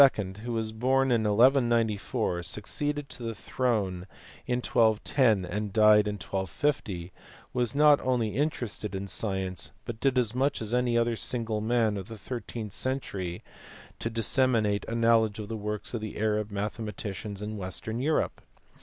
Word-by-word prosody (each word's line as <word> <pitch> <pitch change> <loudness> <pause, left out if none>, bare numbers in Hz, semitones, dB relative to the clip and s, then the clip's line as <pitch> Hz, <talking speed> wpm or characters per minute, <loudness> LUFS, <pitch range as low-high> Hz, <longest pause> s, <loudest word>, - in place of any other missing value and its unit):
who 120 - -3
was 110 -1 -2
born 130 +4 +2
in 115 -2 +2
1194, 115 -5 +2
succeeded 145 - -2
to 130 - -7
the 115 -1 -4
throne 100 -10 -1 0.4
in 125 - +1
1210, 110 -2 +2
and 105 +3 -3
died 105 0 +6
in 105 - -2
1250, 95 - -2 0.4
was 120 0 0
not 150 0 +6
only 125 -4 +1
interested 110 - -2
in 95 +1 -4
science, 95 -3 -2 0.2
but 115 -1 -6
did 135 0 +1
as 120 -3 +2
much 135 +3 +1
as 110 +1 -4
any 125 -1 +2
other 115 0 +2
single 115 -2 -1
man 110 -2 +1
of 95 - -6
the 115 - -8
thirteenth 115 -2 -6
century 100 -10 -3 0.6
to 115 - -2
disseminate 115 -2 +2
a 115 - -3
know 115 0 +5
ledge 110 -2 -2
of 105 -1 -6
the 115 - -3
works 105 +1 -4
of 115 - -2
the 110 -1 -6
Arab 105 -1 0
mathematicians 105 -1 -4
in 105 +1 -4
western 105 +4 -4
Europe. 150 +4 0
110 Hz, 155 wpm, -28 LUFS, 105-120 Hz, 0.6 s, died